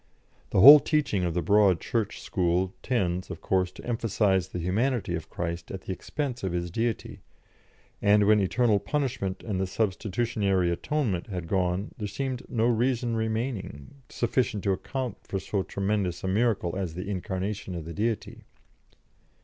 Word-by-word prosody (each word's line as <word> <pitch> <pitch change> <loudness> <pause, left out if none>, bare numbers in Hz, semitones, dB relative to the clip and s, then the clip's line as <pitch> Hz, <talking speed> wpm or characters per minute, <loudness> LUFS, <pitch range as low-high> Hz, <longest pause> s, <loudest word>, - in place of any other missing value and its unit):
The - - +3
whole 145 +7 +12
teaching 145 - 0
of 85 -1 -2
the 90 - 0
Broad 100 0 +4
Church 110 -3 -2
school 90 -1 0
tends, 90 -8 -1
of - - -6
course, 95 -1 0
to - - -11
emphasise 105 -5 +1
the 95 - -6
humanity 105 +4 0
of 85 -2 -4
Christ 85 0 -4
at 95 - -6
the - - -6
expense 130 - -4
of 95 -2 -2
His 85 -1 -2
Deity, 115 +3 -2 0.8
and 105 0 +5
when 105 +1 +5
eternal 105 +2 +2
punishment 120 -4 -2
and 100 -4 -2
the 95 - 0
substitutionary 100 -2 0
atonement 105 - -1
had 90 -5 -5
gone 95 +2 -1
there 105 - -2
seemed 130 +4 -3
no 115 -2 +1
reason 120 0 +1
remaining 110 - -4
sufficient 120 -3 0
to 100 - +2
account 125 +3 -3
for 95 - -4
so 95 +1 -2
tremendous 100 -2 -2
a - - -1
miracle 100 -3 +1
as 95 -4 -3
the 90 +2 -5
incarnation 95 0 -3
of 85 -2 -6
the 85 - -6
Deity. 110 +2 -3
100 Hz, 160 wpm, -27 LUFS, 90-115 Hz, 0.8 s, whole